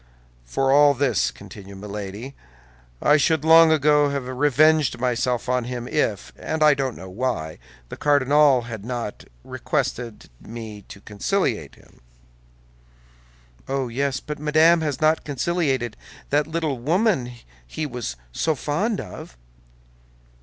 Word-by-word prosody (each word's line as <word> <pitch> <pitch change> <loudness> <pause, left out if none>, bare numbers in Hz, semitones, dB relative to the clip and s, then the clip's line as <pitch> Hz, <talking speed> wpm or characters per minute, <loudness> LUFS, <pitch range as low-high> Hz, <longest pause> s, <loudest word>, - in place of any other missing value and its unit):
"For 135 - 0
all 145 0 +6
this," 130 -5 +1
continued 100 -1 -12
Milady, 105 +5 -7 0.7
"I 150 - +5
should 160 0 +1
long 165 0 +7
ago 150 -1 +3
have 140 -3 -3
revenged 145 +1 +3
myself 125 0 -1
on 125 -1 0
him 120 -1 -5
if, 110 -10 -1
and 160 -1 -2
I 150 -1 +7
don't 135 -3 -2
know 95 - -9
why, 95 -6 -3 0.3
the - - -8
cardinal 145 -2 +4
had 115 -4 -7
not 120 -3 -5 0.2
requested 120 -3 -3
me 110 -2 -8
to 100 - -12
conciliate 105 - -2
him." - - -22 1.7
"Oh, 135 -2 -2
yes; 135 +2 -1
but 150 -1 -7
Madame 155 +3 +4
has 150 -3 -3
not 155 +1 +3
conciliated 140 -5 -1 0.4
that 145 +1 +2
little 160 -5 -2
woman 155 - +1 0.3
he 155 - -4
was 125 - -5 0.2
so 160 - 0
fond 180 - -1
of." - - -9
135 Hz, 130 wpm, -23 LUFS, 120-150 Hz, 1.7 s, long